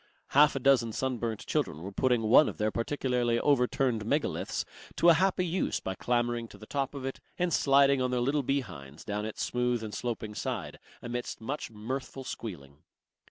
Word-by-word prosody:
Half 150 Hz, +1 st, +5 dB
a -, -, 0 dB
dozen 125 Hz, -4 st, +3 dB
sunburnt 120 Hz, -4 st, -2 dB
children 80 Hz, -, -1 dB
were 100 Hz, -, -5 dB
putting 120 Hz, +2 st, +1 dB
one 115 Hz, +8 st, +6 dB
of -, -, -8 dB
the 110 Hz, 0 st, 0 dB
partially 120 Hz, -1 st, 0 dB
overturned 125 Hz, -4 st, +2 dB
megaliths 145 Hz, +8 st, -1 dB, 0.3 s
to 170 Hz, -, +5 dB
a -, -, +9 dB
happy 185 Hz, +1 st, +2 dB
use 180 Hz, +2 st, 0 dB
by 95 Hz, -, -4 dB
clambering 120 Hz, +2 st, 0 dB
to 105 Hz, -, -14 dB
the 110 Hz, -, -11 dB
top 140 Hz, +3 st, -2 dB
of 135 Hz, -2 st, -5 dB
it 135 Hz, -, -4 dB, 0.2 s
and 175 Hz, -2 st, 0 dB
sliding 140 Hz, -1 st, +4 dB
on 125 Hz, -, +1 dB
their 125 Hz, 0 st, 0 dB
little 140 Hz, +4 st, +1 dB
behinds 80 Hz, -, -4 dB
down 105 Hz, 0 st, -2 dB
its 110 Hz, -, -4 dB
smooth 125 Hz, -1 st, 0 dB
and 105 Hz, -1 st, -6 dB
sloping 110 Hz, -3 st, -3 dB
side -, -, -4 dB, 0.2 s
amidst 120 Hz, 0 st, -4 dB
much 135 Hz, +7 st, -4 dB
mirthful 130 Hz, +5 st, -5 dB
squealing. 80 Hz, -, -7 dB
125 Hz, 180 wpm, -30 LUFS, 110-135 Hz, 0.3 s, a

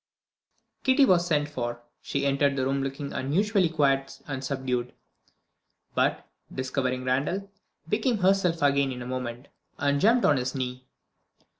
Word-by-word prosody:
Kitty 265 Hz, +1 st, +5 dB
was 175 Hz, -5 st, +3 dB
sent 150 Hz, -3 st, +1 dB
for. 120 Hz, -4 st, -4 dB, 0.2 s
She 140 Hz, 0 st, -2 dB
entered 140 Hz, 0 st, +2 dB
the 130 Hz, -1 st, 0 dB
room 135 Hz, +1 st, 0 dB
looking 135 Hz, +1 st, -4 dB
unusually 185 Hz, +7 st, +1 dB
quiet 135 Hz, -3 st, +1 dB
and 135 Hz, -1 st, -4 dB
subdued 130 Hz, -2 st, -2 dB, 1.0 s
but, -, -, 0 dB, 0.2 s
discovering 130 Hz, -1 st, -2 dB
Randal, 150 Hz, +10 st, -1 dB, 0.4 s
became 220 Hz, +5 st, +1 dB
herself 185 Hz, -4 st, +2 dB
again 140 Hz, -1 st, +3 dB
in 125 Hz, -1 st, -6 dB
a -, -, -8 dB
moment, 125 Hz, 0 st, -5 dB, 0.3 s
and 140 Hz, 0 st, +1 dB
jumped 235 Hz, +3 st, +4 dB
on 145 Hz, -, +4 dB
his 130 Hz, +1 st, -2 dB
knee. 130 Hz, -1 st, -4 dB
140 Hz, 140 wpm, -27 LUFS, 130-170 Hz, 1.0 s, Kitty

